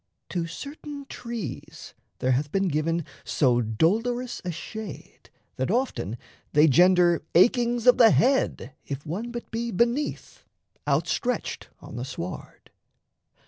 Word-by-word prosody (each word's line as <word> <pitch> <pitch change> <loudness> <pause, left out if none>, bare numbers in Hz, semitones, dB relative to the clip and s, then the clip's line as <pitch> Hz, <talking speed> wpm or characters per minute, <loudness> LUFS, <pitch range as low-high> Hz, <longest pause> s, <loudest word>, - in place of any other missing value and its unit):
To 170 -2 -2
certain 285 - -8
trees 235 - -7 0.2
There 130 - +1
hath 140 +3 0
been 195 -1 +1
given 160 +1 0 0.2
so 125 -4 +2
dolorous 225 - 0
a 180 - -2
shade 195 +4 -8 0.3
That 130 - -1
often 220 - -1 0.4
they 150 +2 +6
gender 175 +2 +5
achings 240 +5 +4
of 250 - +6
the 230 -2 +9
head, 250 - +2
If 140 +1 -6
one 195 +10 -4
but 240 0 -7
be 235 +1 -2
beneath, 235 +7 -1 0.4
outstretched 245 -3 -1
on - - -9
the 120 - -3
sward. 90 -9 -8
185 Hz, 125 wpm, -26 LUFS, 150-240 Hz, 0.4 s, the